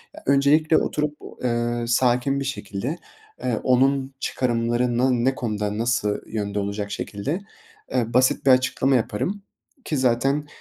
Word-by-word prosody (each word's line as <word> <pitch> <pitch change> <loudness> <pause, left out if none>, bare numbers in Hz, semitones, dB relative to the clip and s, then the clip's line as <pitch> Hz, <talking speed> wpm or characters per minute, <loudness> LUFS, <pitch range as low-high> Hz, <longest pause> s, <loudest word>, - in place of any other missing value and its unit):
Eee, - - -11
öncelikle 145 +3 +4
oturup, 150 0 -1 0.3
eee, 120 -1 0
sakin 125 +3 +2
bir 140 - -3
şekilde, 130 - -4 0.5
eee, 120 -3 0
onun 135 +1 +2
çıkarımlarına 120 0 +1
ne 125 +2 +1
konuda, 105 -3 -2
nasıl 110 -3 0
yönde 105 -2 -3
olacak 100 0 -3
şekilde, 105 - -3 0.5
eee, 120 -2 0
basit 130 +2 +3
bir 135 - +7
açıklama 130 +1 +3
yaparım 130 - -1 0.4
ki 150 - -1
zaten 135 +4 +1
125 Hz, 130 wpm, -23 LUFS, 115-135 Hz, 0.5 s, bir